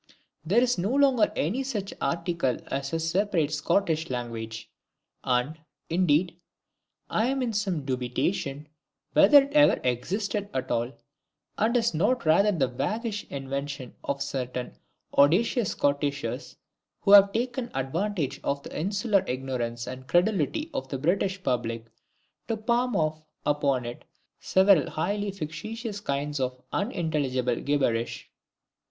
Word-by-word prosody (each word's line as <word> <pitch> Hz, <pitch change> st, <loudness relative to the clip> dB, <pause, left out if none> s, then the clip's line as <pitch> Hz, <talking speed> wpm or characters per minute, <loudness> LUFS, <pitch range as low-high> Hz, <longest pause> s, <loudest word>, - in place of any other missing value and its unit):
There 205 Hz, +10 st, +3 dB
is 245 Hz, -5 st, +1 dB
no 190 Hz, +4 st, 0 dB
longer 270 Hz, -5 st, +4 dB
any 205 Hz, -, 0 dB
such 220 Hz, -7 st, -3 dB
article 170 Hz, -6 st, 0 dB
as 135 Hz, 0 st, -2 dB
a 165 Hz, -, -1 dB
separate 165 Hz, -2 st, 0 dB
Scottish 160 Hz, +1 st, +1 dB
language, 115 Hz, -3 st, -5 dB, 0.6 s
and, 130 Hz, +5 st, 0 dB, 0.3 s
indeed, 170 Hz, 0 st, +2 dB, 0.7 s
I 220 Hz, +2 st, +1 dB
am 270 Hz, 0 st, 0 dB
in 235 Hz, -2 st, -1 dB
some 190 Hz, -8 st, -1 dB
dubitation 135 Hz, +3 st, -2 dB, 0.5 s
whether 285 Hz, -2 st, +8 dB
it 280 Hz, +1 st, -8 dB
ever 295 Hz, -1 st, +5 dB
existed 200 Hz, -, -1 dB
at 130 Hz, -, -2 dB
all, 120 Hz, +1 st, 0 dB, 0.7 s
and 230 Hz, +3 st, +3 dB
is 230 Hz, -4 st, +1 dB
not 205 Hz, +8 st, +1 dB
rather 200 Hz, +7 st, +5 dB
the 150 Hz, -9 st, +1 dB
waggish 210 Hz, -, -3 dB
invention 140 Hz, -1 st, -5 dB
of 140 Hz, 0 st, -2 dB
certain 125 Hz, -3 st, -4 dB, 0.4 s
audacious 195 Hz, -, +3 dB
Scottishers, 140 Hz, -4 st, -1 dB, 0.5 s
who 200 Hz, -, +2 dB
have 200 Hz, -1 st, +9 dB
taken 240 Hz, +2 st, -2 dB
advantage 145 Hz, +1 st, -2 dB
of 140 Hz, 0 st, -1 dB
the -, -, -9 dB
insular 200 Hz, +3 st, +1 dB
ignorance 125 Hz, -2 st, -3 dB
and 130 Hz, +1 st, -8 dB
credulity 195 Hz, -, +1 dB
of 130 Hz, -, -3 dB
the 135 Hz, -, -3 dB
British 190 Hz, +6 st, 0 dB
public 115 Hz, -4 st, -1 dB, 0.6 s
to 225 Hz, -, -1 dB
palm 240 Hz, +3 st, 0 dB
off 155 Hz, -1 st, 0 dB, 0.2 s
upon 140 Hz, -4 st, +1 dB
it 120 Hz, 0 st, -7 dB, 0.3 s
several 190 Hz, -4 st, +4 dB
highly 205 Hz, +5 st, -1 dB
fictitious 205 Hz, +5 st, -5 dB
kinds 145 Hz, -5 st, -2 dB
of 130 Hz, -1 st, -2 dB
unintelligible 150 Hz, -, 0 dB
gibberish! 125 Hz, -5 st, -1 dB
160 Hz, 130 wpm, -27 LUFS, 135-205 Hz, 0.7 s, have